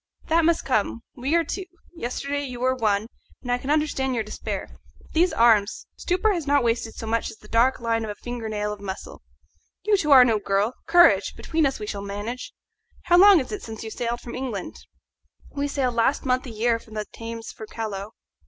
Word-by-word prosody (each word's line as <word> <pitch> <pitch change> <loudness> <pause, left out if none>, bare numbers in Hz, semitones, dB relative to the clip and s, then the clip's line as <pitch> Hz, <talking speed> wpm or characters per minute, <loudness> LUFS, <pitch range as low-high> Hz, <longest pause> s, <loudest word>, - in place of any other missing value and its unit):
"That 330 0 +4
must 335 0 +2
come. 205 - 0
We 270 +6 -1
are 340 - +4
two. 370 +4 -5 0.3
Yesterday 280 +1 -3
you 250 -2 -7
were 255 +1 +2
one, 215 -4 +1 0.4
and 245 - -3
I 245 - +1
can 265 - -6
understand 290 -4 +1
your 225 - 0
despair. 215 - -5 0.3
But - - -21
these 350 +3 +3
arms 220 -3 +3
stupor 370 +4 +1
has 335 -5 -3
not 285 -2 +3
wasted 230 -1 -1
so - - -6
much 225 +1 -1
as 225 - -11
the 210 - -17
dark 235 +4 +3
line 230 -1 0
of 220 - -4
a 205 - -4
finger 240 0 -6
nail 210 -1 -2
of 205 - -11
muscle. 190 -1 -7 0.6
You 420 +1 +3
too 305 -5 -1
are 260 -3 +9
no 225 -3 +2
girl. 200 +3 0
Courage! 345 +1 +5
between 320 -3 +1
us 270 - -4
we 210 - -4
shall 205 -1 -4
manage. 205 +5 -5 0.5
How 350 0 +4
long 395 -2 +8
is 260 - -5
it 415 - -4
since 220 -1 -8
you 220 - -6
sailed 240 +1 -3
from 235 - -8
England?" 250 -7 -4 0.8
"We 285 0 -2
sailed 270 -3 0
last 235 +5 +1
month 255 0 +1
a - - -6
year 230 +1 +1
from 220 -1 -14
the 210 0 -2
Thames 230 0 -8
for 220 - -10
Callao." 210 -2 -5
240 Hz, 215 wpm, -24 LUFS, 220-285 Hz, 0.8 s, are